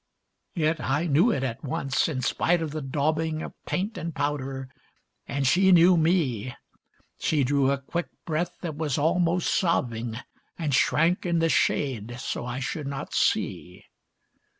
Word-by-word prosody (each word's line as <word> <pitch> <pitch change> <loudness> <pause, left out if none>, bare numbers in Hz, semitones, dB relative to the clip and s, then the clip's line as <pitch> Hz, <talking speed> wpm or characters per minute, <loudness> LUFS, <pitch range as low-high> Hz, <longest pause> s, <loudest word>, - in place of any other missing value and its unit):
Yet 160 -1 +1
I 145 +5 0
knew 165 +8 +4
it 135 - -1
at 115 -3 -4
once, 135 -1 0
in 135 -5 -3
spite 175 +7 +2
of 155 - -4
the 155 +1 -4
daubing 155 +3 -1
Of - - -7
paint 205 +5 -2
and 165 -1 -5
powder, 135 -2 -2 0.6
and 140 -1 -1
she 190 +8 +4
knew 175 +1 +7
me; 150 - +1 0.6
She 150 -3 +1
drew 135 +1 +2
a 140 - +2
quick 170 +6 -4 0.2
breath 170 +2 -2
that 160 -4 -4
was 150 -3 -1
almost 170 +3 +1
sobbing 120 - 0 0.4
And 155 -4 -2
shrank 165 +6 +3
in 170 -2 0
the 165 0 +2
shade 120 -6 0
so 120 - -4
I 125 +1 -3
should 140 +2 -4
not 140 -1 -5
see. - - -1
150 Hz, 155 wpm, -26 LUFS, 135-170 Hz, 0.6 s, knew